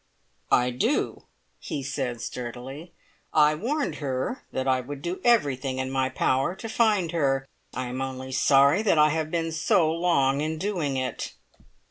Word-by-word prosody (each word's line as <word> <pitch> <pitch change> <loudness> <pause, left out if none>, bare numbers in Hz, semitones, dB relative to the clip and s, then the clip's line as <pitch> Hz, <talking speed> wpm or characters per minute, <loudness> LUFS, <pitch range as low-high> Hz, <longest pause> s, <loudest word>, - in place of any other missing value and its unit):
"I 125 0 +4
do," 125 - -1 0.3
he 140 - -4
said 130 -4 -3
sturdily. 125 +7 -7 0.4
"I 150 0 +6
warned 275 - -2
her 135 - -3
that 130 0 -2
I 130 -1 +2
would 140 +2 -8
do 175 +2 -3
everything 140 - +2
in 130 0 -2
my 130 -1 +1
power 135 +5 +1
to 225 - -7
find 215 -7 +2
her. 135 -5 +1 0.3
I 130 - -2
am 125 +2 -4
only 130 0 -5
sorry 140 +6 +4
that 210 -7 +2
I 150 0 +6
have 155 0 -1
been 165 0 -1
so 160 0 +2
long 145 -5 +2
in 155 +1 -2
doing 160 -7 -1
it." 130 - -4
140 Hz, 160 wpm, -26 LUFS, 130-165 Hz, 0.4 s, I